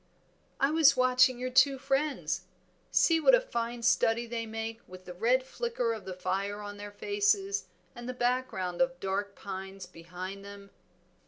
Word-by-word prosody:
"I 275 +2 +3
was 315 -4 +5
watching 255 0 +4
your 255 +1 -4
two 270 +1 +5
friends. 270 - -1 0.4
See 330 -1 +4
what - - +6
a - - +3
fine 235 - -4
study 235 0 +3
they 230 -1 -4
make 225 +1 -5
with 185 0 -12
the 180 - -8
red 240 +8 +2
flicker 265 - -2
of 220 -3 -8
the 185 -1 -6
fire 200 +3 -2
on 205 0 -7
their 205 0 -7
faces 400 - 0 0.3
and 240 0 -7
the - - -2
background 245 -8 -1
of 265 0 +1
dark 200 +1 -2
pines 195 -1 -7
behind 180 +3 -8
them." 200 0 -11
230 Hz, 165 wpm, -30 LUFS, 195-260 Hz, 0.4 s, what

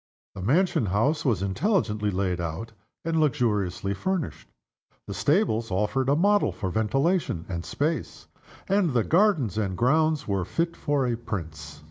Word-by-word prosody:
The - - -7
mansion 140 - +2
house 115 - +1
was 110 - +1
intelligently 105 - 0
laid 90 -2 -1
out, 85 +7 -4 0.3
and 165 -1 +1
luxuriously 105 - 0
furnished. 185 - -3 0.6
The - - -6
stables 145 - +1
offered 105 +8 0
a 140 - +4
model 205 +5 +3
for 95 - -4
ventilation 135 - 0
and 85 -2 -4
space; 155 - -3 0.4
and 190 -6 +2
the 120 -3 +2
gardens 160 - +2
and 95 -4 -2
grounds 155 +4 +2
were 100 -3 0
fit 165 - -2
for 145 -2 0
a 120 -1 0
prince. 80 -10 -6
120 Hz, 145 wpm, -26 LUFS, 95-160 Hz, 0.6 s, a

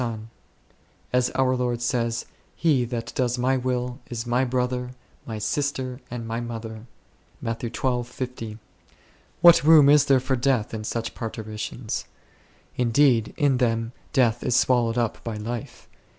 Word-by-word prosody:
son; 115 -2 -4 0.8
as 125 0 +3
our 130 -1 +2
Lord 125 -1 -1
says, 120 -1 -1
" - - -36
He 140 -7 +4
that 120 0 -5
doeth 125 -1 0
my 130 +2 +2
will 125 -1 -2
is 120 -1 -4
my 120 +2 +2
brother, 125 0 -1 0.3
my 110 -2 -4
sister, 130 +2 -2
and 115 -1 -5
my 115 +1 -2
mother 115 -1 -6 0.5
V 120 0 -3 0.8
What 170 -3 +8
room 150 -2 +7
is 145 0 +6
there 135 -1 +4
for 130 +1 -1
death 120 -4 0
in 110 -1 -4
such 115 +1 -3
parturi 110 -2 -6
tions? 115 +1 -4 0.7
Indeed 120 -1 +3
in 140 -3 +3
them 115 -2 0 0.2
death 120 -5 +2
is 120 - 0
swallowed 120 -3 +3
up 115 -2 -1
by 115 -2 -4
life. 115 +2 -6
120 Hz, 145 wpm, -25 LUFS, 115-130 Hz, 0.8 s, What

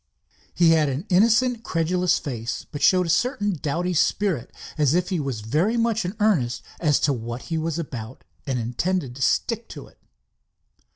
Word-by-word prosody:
He 170 -2 +5
had 155 -3 +3
an 140 +7 -3
innocent, 230 +5 +3
credulous 180 0 +1
face, 115 -4 -5
but 145 - -6
showed 185 +5 +4
a - - -4
certain 205 - +1
doughty 170 +3 -2
spirit, 170 - +1 0.3
as 150 -1 +2
if 180 0 +1
he 185 -4 -1
was 135 -7 -3
very 160 - +1
much 230 -2 +1
in 185 +4 -4
earnest 160 - +1 0.2
as 150 -4 +2
to 145 - +2
what 120 0 -5
he - - +1
was 160 0 -2
about 130 -7 -6 0.2
and 130 -2 -1
intended 125 +4 -2
to 135 - -9
stick - - 0
to - - -9
it. - - -22
165 Hz, 175 wpm, -24 LUFS, 135-185 Hz, 0.3 s, He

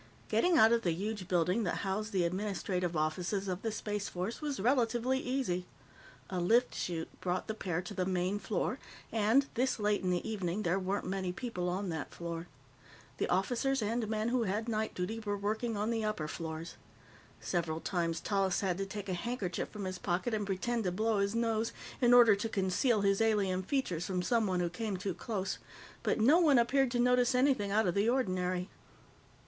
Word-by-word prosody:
Getting 355 -2 +3
out 225 -6 +7
of 235 0 +3
the 175 -6 +1
huge 200 +1 -4
building 180 +4 +2
that 190 - -1
housed 210 +3 -2
the 185 -3 +2
administrative 180 -1 -1
offices 180 +6 -1
of 185 0 -2
the 225 - -1
Space 210 -1 -3
Force 185 - -4
was 290 -3 -3
relatively 240 +2 +2
easy. 250 -10 -1 0.6
A 185 - -1
lift 230 +8 +3
chute 165 -2 -3
brought 180 0 -1
the 220 - -3
pair 180 -5 -2
to 180 - -7
the 185 - -1
main 185 +2 0
floor, - - -2 0.3
and, 225 +5 +3
this 260 +2 +1
late 210 0 +1
in 185 - -1
the 180 +4 0
evening, 200 -2 -2
there 180 +1 +1
weren't 195 +2 -2
many 185 -1 -2
people 180 -3 -3
on 190 +2 -2
that 160 -3 -5
floor. 170 0 -5 0.7
The - - 0
officers 245 +9 +1
and 225 +1 -1
men 215 +1 0
who 250 0 +1
had 210 +4 -1
night 220 -1 -1
duty 185 +5 -2
were 205 -2 -2
working 215 +2 -1
on 210 +3 0
the 225 -1 -1
upper 215 -8 -2
floors. 160 +1 -6 0.6
Several 165 -3 -1
times, 165 -2 -1
Tallis 195 0 +1
had 190 -2 0
to 195 - -2
take 205 0 -6
a 185 - -1
handkerchief 185 -1 -3
from 205 -2 -6
his 185 0 -4
pocket 185 +7 -1
and 210 -2 -1
pretend 225 +4 -1
to 180 - +1
blow 215 +3 +1
his 200 +2 0
nose 230 -1 0 0.3
in 240 -1 +5
order 240 -4 +8
to 215 +3 -3
conceal 200 +4 +1
his 195 +1 +2
alien 200 -4 +2
features 185 - -1
from 180 -2 -1
someone 205 -5 +1
who 175 - 0
came 210 0 -3
too 190 +1 -3
close, 195 -1 -3 0.4
but - - 0
no 280 +10 +6
one 300 -6 +5
appeared 260 +3 +3
to 240 0 -1
notice 250 +1 +3
anything 250 -6 +3
out 215 +2 +2
of 175 - +1
the 200 +4 +2
ordinary. 185 -7 0
205 Hz, 195 wpm, -32 LUFS, 180-230 Hz, 0.7 s, order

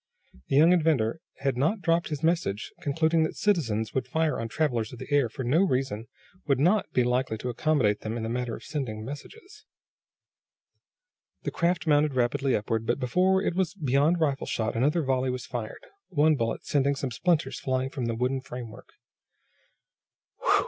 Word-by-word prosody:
The - - 0
young 160 +5 +7
inventor 155 -7 +2 0.2
had 135 -2 0
not 165 - +1
dropped 170 0 +2
his 150 -1 -4
message, 160 - 0
concluding 160 +3 +2
that 160 - 0
citizens 115 - 0
who - - -3
would 130 -1 -1
fire 160 +1 0
on 115 - -3
travelers 120 -4 -1
of 125 - -9
the - - -7
air 140 -5 +3
for 130 +4 -6
no 140 +9 +3
reason, 130 - 0 0.4
would 140 -3 +2
not 185 +8 +2
be 125 - +2
likely 125 -1 0
to 125 - -4
accommodate 120 -5 +1
them 110 +2 -4
in 115 - -4
the - - -2
matter 120 -1 -2
of - - -11
sending 120 -8 -4
messages. 415 - -10 1.8
The - - -2
craft 175 +1 0
mounted 150 -2 +3
rapidly 130 +2 +1
upward, 110 +2 -2
but - - +1
before 185 +9 +2
it - - 0
was 185 0 -1
beyond 150 +1 +2
rifle 140 -4 0
shot 110 0 -1
another 150 +8 +2
volley 130 -1 +1
was 125 -1 -4
fired, 115 -3 -6 0.2
one 155 -2 +4
bullet 115 -5 -2
sending 140 0 +2
some 135 -2 -3
splinters 170 +7 0
flying 130 -1 -1
from 130 -4 -3
the 115 -1 -1
wooden 130 +3 0
framework. 125 -3 -9
135 Hz, 175 wpm, -27 LUFS, 120-160 Hz, 1.8 s, young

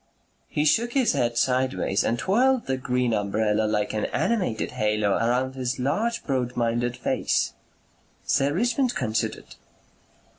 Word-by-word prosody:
He 150 - -1
shook 235 +10 +2
his 260 -8 +2
head 120 -4 0
sideways 130 -6 +1
and 115 - 0
twirled 245 - +2
the 135 - 0
green 125 -2 0
umbrella 105 +1 +1
like 105 -1 -1
an 110 - -1
animated 180 - -1
halo 105 -1 0
around 125 +5 +1
his 130 -1 -3
large 215 - -1
broad 125 -3 -2
minded 120 +1 0
face. - - 0 0.7
Sir 140 +1 +2
Richmond 240 - +1
considered. 110 -3 -3
125 Hz, 135 wpm, -25 LUFS, 110-160 Hz, 0.7 s, shook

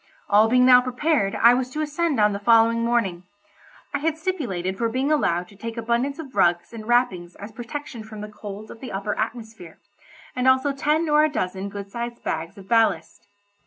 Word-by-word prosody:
All 215 +2 +5
being 250 +1 +4
now 250 -1 +8
prepared 250 -4 0
I 235 +1 +6
was 250 0 -1
to 300 +4 -4
ascend 305 -2 -1
on 210 -1 +4
the 200 - -4
following 230 +1 +4
morning. 230 -7 0 0.7
I 285 - 0
had 320 +2 -1
stipulated 240 - -3
for 230 - +1
being 260 +5 -1
allowed 180 - +1
to 200 - -17
take 230 +3 -7
abundance 235 +5 -1
of 290 -5 -9
rugs 175 +4 +1
and 220 -1 -8
wrappings 215 -8 +1
as 205 +2 -9
protection 245 +2 -7
from 215 -1 -10
the 210 - -6
cold 210 0 -9
of 225 - -12
the 255 - -8
upper 200 +2 -3
atmosphere, 220 -6 -6 0.6
and 250 0 0
also 260 +2 +4
ten 300 +4 0
or 300 0 +4
a 310 - +3
dozen 190 -7 -3
good 200 0 -8
sized 235 +1 -6
bags 165 +3 -4
of 195 -1 -12
ballast. 225 -2 +1
230 Hz, 200 wpm, -23 LUFS, 205-260 Hz, 0.7 s, now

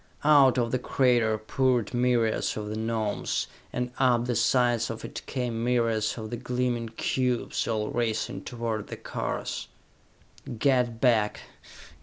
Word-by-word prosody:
Out 140 -4 +6
of 120 -2 +1
the 130 - +1
crater 120 -4 +2
poured 125 +1 0
myriads 120 -3 +1
of 105 -1 -4
the 105 - -4
Gnomes, 110 -1 -1 0.3
and 125 0 -2
up 120 -2 +3
the 120 -1 -1
sides 120 0 +2
of 115 - -6
it - - -6
came 120 -3 -2
myriads 115 -3 +1
of 110 -1 -6
the 120 - -3
gleaming 125 -1 -1
cubes, 125 +2 -1
all 110 -2 -1
racing 115 -2 -2
toward 115 -3 -3
the - - -7
cars. - - -4 0.9
"Get 125 -2 +2
back! 115 -5 +2
120 Hz, 140 wpm, -27 LUFS, 110-125 Hz, 0.9 s, Out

